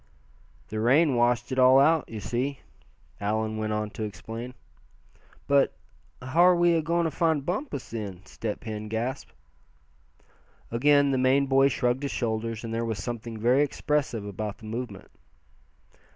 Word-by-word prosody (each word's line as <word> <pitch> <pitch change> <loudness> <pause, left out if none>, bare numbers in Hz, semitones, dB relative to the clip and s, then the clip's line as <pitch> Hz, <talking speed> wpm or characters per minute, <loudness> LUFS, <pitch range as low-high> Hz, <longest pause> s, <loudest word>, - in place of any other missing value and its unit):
"The 110 - -3
rain 135 +6 +4
washed 120 +1 +1
it 130 - 0
all 130 +1 +7
out, 155 +3 +4
you 110 - -6
see," 130 +6 -3 0.6
Allan 110 +1 -1
went 110 0 -2
on 105 0 -2
to - - -8
explain. 115 +5 -7 0.9
"But 140 -1 +2 0.4
how 130 +7 +1
are 180 0 +7
we 175 0 +4
agoin' 165 +1 +1
to 160 - 0
find 160 -2 +1
Bumpus, 180 - -4
then?" 100 -5 -6
Step 105 +2 -5
Hen 110 -2 -5
gasped. 120 +5 -4 1.4
Again 145 +4 +4
the 130 - +1
Maine 130 +2 +3
boy 135 0 +4
shrugged 125 0 0
his 140 - -3
shoulders, 115 -1 -2
and 115 -1 -5
there 115 +1 -1
was 115 -2 -2
something 115 +2 -5
very 120 +5 +3
expressive 145 -6 -1
about 105 +1 -5
the 110 - -14
movement. 110 -2 -6
120 Hz, 150 wpm, -27 LUFS, 110-140 Hz, 1.4 s, all